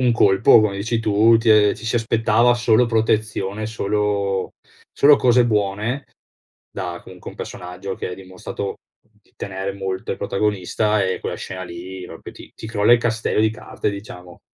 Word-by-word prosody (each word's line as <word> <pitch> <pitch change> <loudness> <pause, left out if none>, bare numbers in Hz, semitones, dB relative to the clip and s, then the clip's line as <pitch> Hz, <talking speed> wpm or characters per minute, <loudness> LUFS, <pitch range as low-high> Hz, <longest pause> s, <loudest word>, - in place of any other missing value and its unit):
un 125 -2 +3
colpo 100 0 +5
come 100 -2 0
dici 115 +3 -1
tu. 110 +1 +4
Ti 110 -2 +5
e - - -2
ci 110 - -12
si 115 - -1
aspettava 115 +1 +2
solo 120 0 +3
protezione, 110 -2 -1
solo 100 -2 -1 0.4
solo 145 0 +6
cose 120 -1 +4
buone, 105 +5 -1 0.7
da 90 -3 -5
comunque 90 -1 -11
un - - -16
personaggio 90 +2 -7
che - - -5
ha - - -5
dimostrato 95 +1 -6 0.3
di 105 -2 -34
tenere 95 0 -4
molto 95 -1 -5
al - - -7
protagonista, 105 +1 0
e 95 0 -1
quella - - -4
scena 95 0 -7
lì 90 +2 -8
proprio - - -10
ti - - -14
ti 110 - -9
crolla 110 +1 +3
il 120 - +6
castello 115 -2 0
di 110 - +3
carte 110 - -5
diciamo. 90 -4 -10
105 Hz, 170 wpm, -21 LUFS, 95-115 Hz, 0.7 s, solo